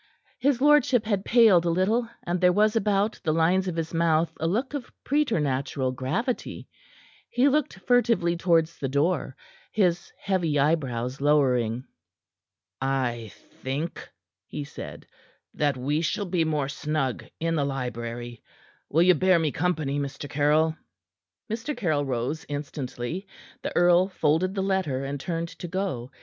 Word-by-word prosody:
His 265 -1 +2
lordship 270 -5 +4
had 200 -3 0
paled 220 -8 +5
a 175 - 0
little, 210 +7 +1
and 175 +1 -2
there 180 0 +6
was 210 +4 +3
about 210 -1 +1
the 155 - +1
lines 175 +4 +2
of 180 - -2
his 165 0 -3
mouth 165 0 +2
a 160 - 0
look 240 - -1
of 280 -4 -5
preternatural 145 - 0
gravity. 135 - -3 0.6
He 250 +3 +3
looked 290 -6 +1
furtively 230 -8 +2
towards 165 -1 +1
the 135 - -2
door, 140 0 0 0.4
his 180 -5 +1
heavy 175 -6 0
eyebrows 135 -4 0
lowering. 130 -5 +2 1.0
"I 125 -5 -1 0.3
think," 145 +6 -4 0.4
he 150 - -5
said, 140 - -9 0.5
"that 145 -3 0
we 145 +5 0
shall 205 +5 -1
be 175 -3 0
more 150 -3 0
snug 140 -2 -2 0.2
in 165 0 0
the 150 -3 +1
library. 120 -3 -4 0.5
Will 165 +4 +4
you 180 +1 +6
bear 185 +2 +4
me 160 -3 0
company, 155 -3 -1
Mr. 140 +1 -5
Caryll?" 150 +3 +2 0.7
Mr. 235 +6 -4
Caryll 155 -10 0
rose 130 +4 -2
instantly. 145 +4 -5 0.3
The - - -5
earl 175 +1 +5
folded 185 +1 +1
the 195 - 0
letter, 185 -9 0
and 140 +1 -4
turned 165 +2 -3
to 175 - -8
go. 175 -9 -3
165 Hz, 145 wpm, -26 LUFS, 140-190 Hz, 1.0 s, there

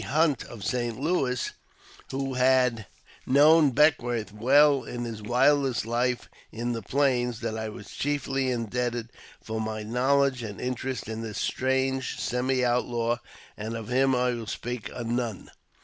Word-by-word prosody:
Hunt, 150 -3 +2
of 115 -5 -10
Saint 120 -2 -1
Louis, 135 -5 0 0.6
who 135 0 -3
had 125 -3 +3 0.4
known 150 +3 +6
Beckwourth 120 -7 +2
well 140 +5 +4
in 120 0 -5
his 115 -2 -5
wildest 130 +2 +2
life 120 +2 0 0.2
in 120 +2 -3
the 115 - -4
Plains, 125 -1 0
that 115 -2 -2
I 110 0 -3
was 105 -1 -10
chiefly 135 -2 -1
indebted 120 0 -2 0.3
for 110 0 -3
my 110 0 -3
knowledge 130 +3 +2
and 105 -4 -6
interest 130 +1 -3
in 110 0 -4
this 110 -2 -5
strange 130 0 0
semi 125 +1 0
outlaw, 120 -1 0 0.4
and 110 +2 -5
of 115 -1 -7
him 130 +1 +3
I 125 0 +2
will 115 -2 -5
speak 120 0 -4
anon. 120 -3 -3
125 Hz, 145 wpm, -27 LUFS, 115-130 Hz, 0.6 s, known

